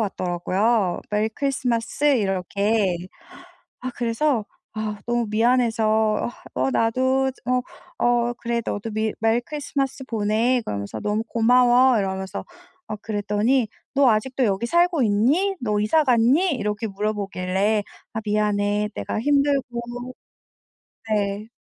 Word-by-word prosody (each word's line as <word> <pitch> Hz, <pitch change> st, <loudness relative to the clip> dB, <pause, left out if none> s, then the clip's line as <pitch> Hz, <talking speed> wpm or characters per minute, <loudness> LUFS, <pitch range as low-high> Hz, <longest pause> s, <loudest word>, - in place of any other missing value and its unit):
왔더라고요. 190 Hz, +1 st, 0 dB
메리 210 Hz, +1 st, +1 dB
크리스마스 250 Hz, 0 st, -2 dB
이렇게. 200 Hz, -1 st, 0 dB, 0.8 s
아 255 Hz, -, -4 dB
그래서 235 Hz, 0 st, 0 dB, 0.3 s
아 215 Hz, -1 st, -3 dB
너무 240 Hz, 0 st, +1 dB
미안해서 230 Hz, 0 st, +2 dB, 0.7 s
어 125 Hz, -, -1 dB
"어 130 Hz, -, +2 dB
나도 260 Hz, -, +1 dB
저 250 Hz, -1 st, -10 dB
어 255 Hz, 0 st, +2 dB, 0.7 s
어 240 Hz, -, -3 dB
그래 235 Hz, 0 st, -2 dB
너도 205 Hz, +2 st, -3 dB
미 220 Hz, 0 st, -1 dB
메리 225 Hz, +1 st, +3 dB
크리스마스 275 Hz, -1 st, -3 dB
보내." 230 Hz, +2 st, +1 dB
그러면서 100 Hz, 0 st, -4 dB
"너무 210 Hz, +1 st, -1 dB
고마워." 245 Hz, +2 st, +4 dB
이러면서 190 Hz, -1 st, -3 dB, 0.4 s
어 215 Hz, -, -4 dB
그랬더니 215 Hz, +3 st, 0 dB, 0.3 s
"너 275 Hz, -2 st, +5 dB
아직도 250 Hz, +4 st, +1 dB
여기 200 Hz, +1 st, +1 dB
살고 345 Hz, +1 st, +2 dB
있니? 265 Hz, -, +2 dB
너 210 Hz, -3 st, 0 dB
이사 235 Hz, +10 st, +3 dB
갔니?" 260 Hz, +8 st, +3 dB
이렇게 210 Hz, -1 st, -2 dB
물어보길래 205 Hz, 0 st, -1 dB, 0.3 s
"아 220 Hz, -, -2 dB
미안해. 210 Hz, 0 st, 0 dB
내가 -, -, -3 dB
힘들고" 280 Hz, 0 st, +2 dB, 1.5 s
네. 205 Hz, +1 st, -1 dB
225 Hz, 270 characters per minute, -23 LUFS, 205-250 Hz, 1.5 s, 너